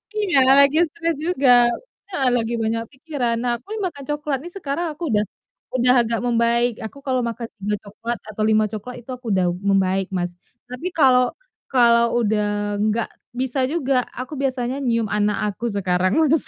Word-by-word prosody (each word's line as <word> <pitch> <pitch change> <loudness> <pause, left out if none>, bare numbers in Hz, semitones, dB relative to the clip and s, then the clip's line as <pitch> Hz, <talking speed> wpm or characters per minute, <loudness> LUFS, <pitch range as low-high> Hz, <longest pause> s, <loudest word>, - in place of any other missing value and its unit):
Iya, 400 -9 +1 0.2
lagi 280 +2 +5
stres 335 +1 -2
juga. 305 -5 +1 0.6
Heeh, 270 -9 +1
lagi 230 0 -1
banyak 230 +1 -1
pikiran. 260 -5 -2
Nah, 245 - +1
aku 250 - -34
ini - - -4
makan 285 -5 -9
coklat 295 -2 -1
nih, 350 - -8
sekarang 335 0 -2
aku 340 - -8
udah 210 0 +3 0.5
udah 250 0 +4
agak 230 -1 -1
membaik, 235 0 +2
aku 280 - -9
kalau 260 -2 0
makan 235 -1 -3
3 210 +1 -1
coklat 230 +3 -5
atau 215 0 -4
5 215 0 +4
coklat, 225 +4 -6
itu 255 - -9
aku 250 -1 -8
udah 185 -1 +2 0.2
membaik, 190 0 +2
Mas, 175 -1 -1 0.3
tapi 250 +8 -6
kalau 255 -5 +4 0.3
kalau 235 -2 +4
udah 205 -1 0
nggak 215 +2 +1 0.3
bisa 260 +1 -1
juga, 270 -5 0
aku 255 +4 -6
biasanya 260 0 -1
nyium 230 -5 0
anak 210 0 +1 0.2
aku 235 +4 -4
sekarang, 185 0 +1 0.2
Mas. 320 - +5
240 Hz, 170 wpm, -22 LUFS, 215-270 Hz, 0.6 s, lagi